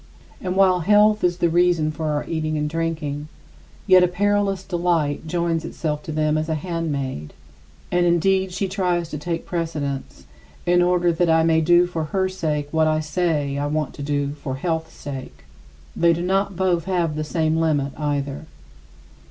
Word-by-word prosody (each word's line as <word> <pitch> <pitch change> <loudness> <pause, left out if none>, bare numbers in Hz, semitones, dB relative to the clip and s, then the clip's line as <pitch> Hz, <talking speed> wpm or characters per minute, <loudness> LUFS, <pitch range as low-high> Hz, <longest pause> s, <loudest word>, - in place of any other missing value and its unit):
And 185 -1 -2
while 190 -2 +4
health 210 +4 +4
is 175 -1 +2
the 175 - +2
reason 170 -2 +2
for 155 +1 -4
our 150 -1 -1
eating 155 -1 -2
and 150 0 -1
drinking, 155 -2 -3 0.6
yet 185 -1 +6
a - - +5
perilous 200 +1 0
delight 170 -5 -1
joins 170 0 -1
itself 155 -2 -3
to 155 - -7
them 155 0 +1
as 155 +1 -3
a 160 - +1
handmaid; 145 - -3 0.6
and 175 0 +2
indeed, 190 +2 +2
she 195 +2 -2
tries 180 -3 -1
to 150 - -5
take 165 +2 -3
precedence 145 - -4 0.4
in 175 0 +4
order 175 -1 +3
that 170 +1 +1
I 160 0 +4
may 160 0 +3
want 160 -1 +1
to 175 - +5
do 175 +1 +6
for 165 -3 -3
her 190 +4 0
sake 155 -6 -2
what 160 -1 +2
I 155 0 +2
say 150 -3 -1
I 145 - -1
want 150 -1 -2
to - - -9
do 145 0 -1
for 145 -2 -5
health's 160 +2 -3
sake. 135 - -8 0.5
They 170 0 +4
do 170 +1 -3
not 195 +1 0
both 175 -2 +1
have 175 -5 0
the 155 - -2
same 160 0 0
limit 145 -4 +1
either. 145 0 -3
165 Hz, 185 wpm, -22 LUFS, 150-180 Hz, 0.6 s, yet